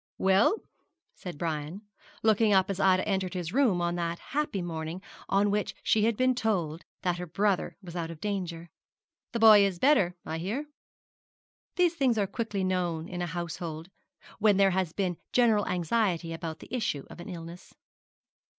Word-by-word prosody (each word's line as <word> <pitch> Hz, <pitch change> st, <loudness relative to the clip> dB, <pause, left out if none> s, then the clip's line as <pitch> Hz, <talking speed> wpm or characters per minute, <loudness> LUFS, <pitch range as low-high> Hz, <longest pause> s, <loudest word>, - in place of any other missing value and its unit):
'Well,' 195 Hz, -, +4 dB, 0.6 s
said 180 Hz, -5 st, -8 dB
Brian, 160 Hz, +4 st, -4 dB, 0.4 s
looking 220 Hz, -1 st, +4 dB
up 190 Hz, 0 st, +3 dB
as 195 Hz, -, -4 dB
Ida 185 Hz, -1 st, +3 dB
entered 190 Hz, -3 st, -1 dB
his 175 Hz, 0 st, -4 dB
room 240 Hz, -10 st, +3 dB
on 175 Hz, 0 st, 0 dB
that 170 Hz, 0 st, -2 dB, 0.2 s
happy 285 Hz, -11 st, -1 dB
morning 165 Hz, 0 st, -4 dB, 0.3 s
on 200 Hz, +1 st, +3 dB
which 210 Hz, 0 st, -1 dB
she 215 Hz, -1 st, +3 dB
had 225 Hz, -2 st, +1 dB
been 255 Hz, 0 st, +3 dB
told 185 Hz, -9 st, -1 dB, 0.2 s
that 180 Hz, -1 st, 0 dB
her 180 Hz, -, -5 dB
brother 200 Hz, +2 st, 0 dB
was 175 Hz, -2 st, -9 dB
out 165 Hz, -2 st, -3 dB
of 165 Hz, -2 st, -8 dB
danger 175 Hz, -5 st, -4 dB, 0.6 s
'the 235 Hz, -, -2 dB
boy 215 Hz, -2 st, +8 dB
is 195 Hz, -3 st, 0 dB
better, 195 Hz, -7 st, +3 dB
I 160 Hz, -, -4 dB
hear?' 220 Hz, -, -3 dB, 1.1 s
These 355 Hz, -2 st, +3 dB
things 265 Hz, -8 st, +1 dB
are 205 Hz, -, +2 dB
quickly 200 Hz, -1 st, -3 dB
known 175 Hz, -3 st, -1 dB
in 175 Hz, -1 st, -5 dB
a 175 Hz, -, -1 dB
household, 170 Hz, 0 st, -5 dB, 0.5 s
when 210 Hz, -2 st, +4 dB
there 195 Hz, -1 st, +5 dB
has 185 Hz, -3 st, 0 dB
been 180 Hz, -2 st, -2 dB, 0.2 s
general 225 Hz, -4 st, +3 dB
anxiety 175 Hz, -1 st, 0 dB
about 165 Hz, -1 st, -6 dB
the -, -, -6 dB
issue 180 Hz, -, -2 dB
of -, -, -11 dB
an 175 Hz, -, -8 dB
illness. 170 Hz, 0 st, -9 dB
185 Hz, 170 wpm, -29 LUFS, 170-210 Hz, 1.1 s, boy